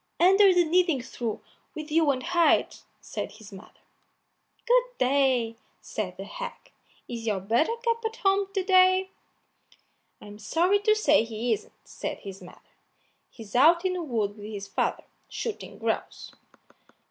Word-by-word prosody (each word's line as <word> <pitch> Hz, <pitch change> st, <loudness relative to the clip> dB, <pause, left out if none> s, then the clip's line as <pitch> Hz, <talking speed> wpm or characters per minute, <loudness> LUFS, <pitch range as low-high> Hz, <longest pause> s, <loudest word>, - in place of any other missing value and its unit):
"Under 385 Hz, +3 st, +6 dB
the 360 Hz, -1 st, +4 dB
kneading 335 Hz, -4 st, +2 dB
trough 235 Hz, -4 st, -5 dB, 0.3 s
with 305 Hz, -1 st, -7 dB
you 320 Hz, -1 st, +3 dB
and 260 Hz, -2 st, 0 dB
hide," 345 Hz, -1 st, +2 dB, 0.2 s
said -, -, -6 dB
his 215 Hz, -2 st, -14 dB
mother. 190 Hz, -, -14 dB, 0.8 s
"Good -, -, +4 dB
day!" 255 Hz, -4 st, +1 dB, 0.2 s
said -, -, -5 dB
the -, -, -6 dB
hag; -, -, -8 dB, 0.4 s
"is 230 Hz, -1 st, -6 dB
your 205 Hz, -3 st, 0 dB
Buttercup 460 Hz, -, 0 dB
at 445 Hz, 0 st, -3 dB
home 395 Hz, -1 st, +1 dB
to 385 Hz, -, +1 dB
day?" 370 Hz, 0 st, +4 dB, 1.1 s
"I'm 210 Hz, 0 st, -12 dB
sorry 345 Hz, -, +2 dB
to 430 Hz, +1 st, +3 dB
say 430 Hz, -, +3 dB
he 230 Hz, +1 st, -2 dB
isn't," 215 Hz, -, -6 dB
said -, -, -6 dB
his 195 Hz, -1 st, -9 dB
mother; 180 Hz, -, -14 dB, 0.7 s
"he's 220 Hz, -3 st, -12 dB
out 335 Hz, +7 st, +5 dB
in 370 Hz, -, +1 dB
the 360 Hz, -, -3 dB
wood 220 Hz, -9 st, -2 dB
with 205 Hz, 0 st, -9 dB
his 200 Hz, -2 st, -6 dB
father, -, -, -1 dB, 0.3 s
shooting 450 Hz, -3 st, -6 dB
grouse." -, -, -3 dB
315 Hz, 145 wpm, -26 LUFS, -, 1.1 s, Under